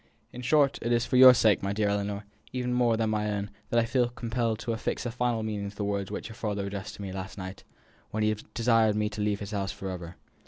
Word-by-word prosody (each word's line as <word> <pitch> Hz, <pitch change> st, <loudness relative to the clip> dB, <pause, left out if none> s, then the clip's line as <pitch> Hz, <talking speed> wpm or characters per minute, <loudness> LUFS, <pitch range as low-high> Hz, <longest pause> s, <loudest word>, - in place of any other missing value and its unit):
In 125 Hz, -, -7 dB
short, 140 Hz, +2 st, +3 dB
it 120 Hz, -, -1 dB
is 120 Hz, 0 st, +2 dB
for 130 Hz, -, -2 dB
your 130 Hz, 0 st, +10 dB
sake, 110 Hz, -4 st, +4 dB
my 100 Hz, +1 st, -1 dB
dear 105 Hz, 0 st, +1 dB
Ellinor, 100 Hz, 0 st, -2 dB, 0.3 s
even 125 Hz, -1 st, -2 dB
more 120 Hz, -2 st, +3 dB
than 115 Hz, -, +1 dB
for 110 Hz, -, +1 dB
my 105 Hz, 0 st, -1 dB
own, 100 Hz, 0 st, -3 dB, 0.2 s
that 120 Hz, -, +3 dB
I 115 Hz, -, +2 dB
feel 120 Hz, 0 st, +1 dB
compelled 115 Hz, -1 st, -1 dB
to 120 Hz, -, -2 dB
affix 110 Hz, -, -3 dB
a 120 Hz, -, -2 dB
final 120 Hz, -2 st, 0 dB
meaning 105 Hz, -2 st, -3 dB
to 100 Hz, -, -14 dB
the 105 Hz, -, -3 dB
words 100 Hz, -1 st, -1 dB
which -, -, -5 dB
your 110 Hz, -, -10 dB
father 105 Hz, -3 st, -2 dB
addressed 100 Hz, +1 st, -5 dB
to 100 Hz, -, -8 dB
me 95 Hz, -, -5 dB
last 95 Hz, +1 st, -6 dB
night, 95 Hz, 0 st, -7 dB, 0.5 s
when 110 Hz, 0 st, -1 dB
he 110 Hz, 0 st, +2 dB, 0.2 s
desired 115 Hz, -2 st, +3 dB
me 105 Hz, 0 st, +1 dB
to 105 Hz, 0 st, -5 dB
leave 105 Hz, 0 st, 0 dB
his 100 Hz, 0 st, -5 dB
house 100 Hz, -2 st, -2 dB
for 95 Hz, -1 st, -5 dB
ever. 90 Hz, -1 st, -7 dB
110 Hz, 265 wpm, -28 LUFS, 100-120 Hz, 0.5 s, your